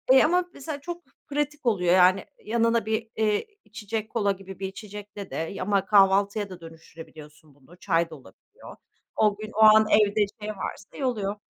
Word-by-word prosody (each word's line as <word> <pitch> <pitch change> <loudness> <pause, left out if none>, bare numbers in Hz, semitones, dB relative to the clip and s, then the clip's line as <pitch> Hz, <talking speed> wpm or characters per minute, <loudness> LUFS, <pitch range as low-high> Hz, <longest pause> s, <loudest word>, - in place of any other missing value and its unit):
Eee, - - +7
ama 355 +3 +2
mesela 285 0 -7
çok 345 +2 -7 0.3
pratik 295 -1 -3
oluyor 180 -6 +2
yani 185 +1 +4 0.2
yanına 230 0 +1
bir, 220 +1 -2
eee, 215 - 0 0.2
içecek 215 0 -5
kola 205 -4 +1
gibi 195 -1 -9
bir 190 - -3
içecekle 205 0 -9
de - - -6
y 165 +4 -4
ama 195 0 +1
kahvaltıya 200 +1 +3
da 180 -2 -11
dönüştürebiliyorsun 160 -2 -14
bunu 145 +6 -20
çay 170 -3 0
da 160 - -9
olabiliyor. 130 -9 -16 0.4
O 210 -2 +2
gün, 215 +1 -8
o 220 - -5
an 215 0 +7
evde, 210 0 +3
işte, 205 +3 -7
ne 215 - -4
varsa 195 - -7
y 270 - -2
oluyor. 210 -5 -1
205 Hz, 185 wpm, -25 LUFS, 185-220 Hz, 0.4 s, Eee